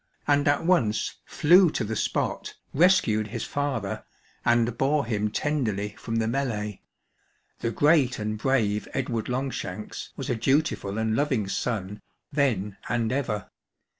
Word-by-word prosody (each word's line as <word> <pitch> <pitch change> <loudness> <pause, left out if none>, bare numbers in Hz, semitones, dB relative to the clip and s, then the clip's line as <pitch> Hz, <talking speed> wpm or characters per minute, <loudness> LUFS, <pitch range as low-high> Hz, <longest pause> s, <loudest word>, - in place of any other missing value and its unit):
and 145 0 +3
at 145 +3 +2
once 130 -13 +2
flew 180 +3 +5
to 130 - -2
the 110 +1 -3
spot> - - -2 0.2
rescued 135 - +4
his 115 +1 -4
father, 135 -9 -2 0.4
and 120 0 +2
bore 140 +2 +1
him 105 -2 0
tenderly 110 -6 -1
from 115 +2 -6
the 110 -1 +1
melee. 110 -5 -2 0.8
The 115 - -1
great 145 0 +3
and 110 0 -2
brave 110 -3 +1
Edward 120 -4 -2
Longshanks 125 -6 -4
was - - -4
a 125 - 0
dutiful 115 -4 +1
and 110 0 0
loving 130 -7 +1
son 105 -1 -3 0.3
then 105 -9 0
and 115 0 0
ever. 120 -7 -2
115 Hz, 135 wpm, -26 LUFS, 105-140 Hz, 0.8 s, flew